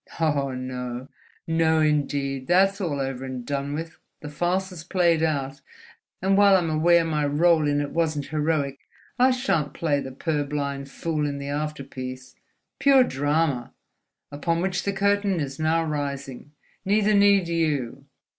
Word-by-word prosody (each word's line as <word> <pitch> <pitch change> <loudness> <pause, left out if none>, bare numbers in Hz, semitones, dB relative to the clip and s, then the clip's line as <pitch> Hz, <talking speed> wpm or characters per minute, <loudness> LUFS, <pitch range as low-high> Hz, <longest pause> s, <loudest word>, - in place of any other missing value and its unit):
"Oh, 145 -4 +1
no! 125 0 -5 0.4
No, 160 -1 +2
indeed: 140 -3 0
that's 195 +3 +3
all 155 -6 -2
over 135 -1 -3
and 130 -2 -6
done 140 +1 -3
with, 165 +1 -6 0.2
the 150 - -7
farce 180 +5 -1
is 170 -4 -9
played 170 -2 +2
out; 140 -4 -1 0.6
and 195 +1 +3
while 200 -1 +6
I'm 170 -3 -1
aware 170 +2 +4
my 155 -2 0
rôle 155 +1 +3
in 145 0 +1
it 145 -1 -3
wasn't 155 -4 -1
heroic, 150 -3 -1 0.4
I 255 +1 +6
shan't 195 - 0
play 150 -4 0
the 130 - -6
purblind 140 -1 -3
fool 155 0 -2
in 140 -1 -3
the 140 0 -6
afterpiece—pure 140 - -1
drama—upon 145 - -3
which 185 -1 -1
the 200 - +1
curtain 200 -1 +1
is 140 -1 -4
now 160 +1 +2
rising. 140 -2 -5 0.3
Neither 210 +1 +2
need 200 -3 +4
you. 145 -6 -1
150 Hz, 145 wpm, -24 LUFS, 140-170 Hz, 0.6 s, while